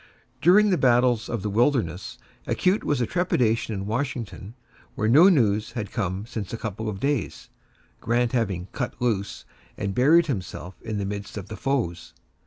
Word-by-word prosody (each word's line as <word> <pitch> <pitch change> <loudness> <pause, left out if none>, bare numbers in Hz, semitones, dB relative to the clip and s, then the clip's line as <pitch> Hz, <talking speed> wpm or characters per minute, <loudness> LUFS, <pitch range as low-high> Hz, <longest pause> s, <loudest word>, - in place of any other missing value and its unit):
During 205 +5 +5
the 180 - +2
battles 120 -2 +3
of 115 -5 -3
the 105 - -1
Wilderness, 110 - 0 0.3
acute 185 +3 +1
was 145 - 0
the 120 - +1
trepidation 120 -10 0
in 95 0 -4
Washington, 115 -2 -4 0.4
where 110 - 0
no 155 - +7
news 110 - +2
had 110 -4 -4
come 95 -3 -2
since 110 -5 -6
a 115 - -3
couple 110 -1 -4
of 95 -2 -5
days 140 -4 -2 0.5
Grant 120 0 +1
having 100 -7 -1
"cut 125 - -4
loose" 105 -5 -2 0.3
and 100 -1 -2
buried 155 - +5
himself 95 - -5
in 110 -2 -4
the 100 - -2
midst 100 +1 -6
of 100 - -7
the 110 - -6
foes. 90 -12 -2
115 Hz, 170 wpm, -25 LUFS, 100-130 Hz, 0.5 s, no